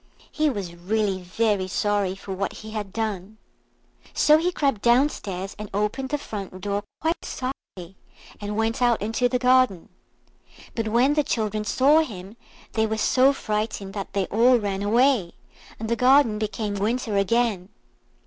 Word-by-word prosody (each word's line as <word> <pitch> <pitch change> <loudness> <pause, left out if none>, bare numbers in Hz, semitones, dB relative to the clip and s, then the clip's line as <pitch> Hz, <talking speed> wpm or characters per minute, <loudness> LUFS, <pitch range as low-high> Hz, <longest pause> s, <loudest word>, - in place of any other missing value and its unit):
He 310 0 +1
was 200 -9 -4
really 190 +2 -1
very 195 +1 0
sorry 200 -1 0
for 195 0 -7
what 195 +1 -3
he 215 0 -10
had 210 -3 -5
done. 215 -2 -4 0.8
So 305 +1 +5
he 350 +2 0
crept 275 - 0
downstairs 235 -7 +1
and 210 -1 -6
opened 210 +6 -1
the 295 - 0
front 200 -8 -7
door 200 +1 -2 0.2
quite 325 +2 -1
softly, 195 -8 -7 0.5
and 205 +1 -4
went 225 +2 0
out 240 -2 +3
into 225 +4 0
the 250 - +1
garden. 250 -7 +2 0.8
But 225 -1 -2
when 245 +6 +3
the 300 - +3
children 215 -4 -2
saw 275 +8 +4
him 205 - -5 0.4
they 220 0 +1
were 220 0 -2
so 260 +5 +4
frightened 210 -5 -3
that 200 -2 -6
they 195 -1 0
all 245 +4 +5
ran 200 -3 -3
away, 230 -3 +2 0.5
and 220 - -4
the 235 - +1
garden 250 -3 +4
became 215 -1 -3
winter 215 +2 -1
again. 200 -2 +1
215 Hz, 160 wpm, -24 LUFS, 200-250 Hz, 0.8 s, So